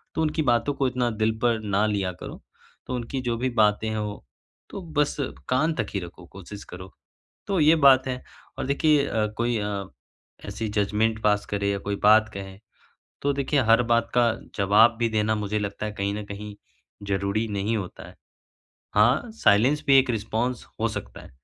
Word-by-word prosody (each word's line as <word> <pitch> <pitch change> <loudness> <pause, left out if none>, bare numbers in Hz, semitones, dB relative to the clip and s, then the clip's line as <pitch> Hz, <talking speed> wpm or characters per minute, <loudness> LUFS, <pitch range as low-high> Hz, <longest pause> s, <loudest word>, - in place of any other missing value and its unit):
तो 160 - 0
उनकी 155 0 0
बातों 120 +2 +1
को 135 -1 0
इतना 125 -1 0
दिल 110 - +3
पर 120 -2 +2
ना 105 +1 +1
लिया 100 -3 -1
करो, - - -9 0.5
तो 125 - -3
उनकी 125 +2 -4
जो 115 -1 0
भी 130 +2 -1
बातें 105 +1 +3
हैं 110 - -3
वो 105 -1 -5 0.5
तो 195 - -7 0.2
बस 150 -1 +2 0.3
कान 155 +6 +2
तक - - -2
ही 100 - 0
रखो, 90 0 -10
कोशिश 100 +3 -11
करो। 90 +1 -9 0.6
तो 195 -3 0
ये 155 +2 +6
बात 130 0 +5
है 125 0 -4 0.3
और 135 - -3
देखिए 140 +1 +2
अ, 110 -1 0
कोई 120 0 0
अ, 100 -1 -3 0.6
ऐसी 110 - -4
जजमेंट 110 +2 0
पास 105 -1 +2
करे 100 0 0
या 100 - -2
कोई 100 - 0
बात 110 +1 +6
कहे 95 -1 -8 0.6
तो 140 0 +1
देखिए 140 0 +1
हर 115 +2 +6
बात 115 0 +1
का 120 -1 +4 0.2
जवाब 105 +4 +4
भी 115 -1 +1
देना 110 0 +1
मुझे 105 0 -2
लगता 100 +1 -4
है 105 - -3
कहीं 100 +1 0
न 105 - -4
कहीं 105 0 -8 0.5
ज़रूरी 100 +3 -1
नहीं 100 +3 -1
होता 95 -4 -7
है। - - -14 0.8
हाँ, 120 - +3
साइलेंस 130 - +3
भी 135 -1 +7
एक 130 -1 +3
रिस्पॉन्स 115 +2 -2 0.2
हो - - +2
सकता - - -7
है, - - -14
110 Hz, 190 wpm, -25 LUFS, 105-125 Hz, 0.8 s, भी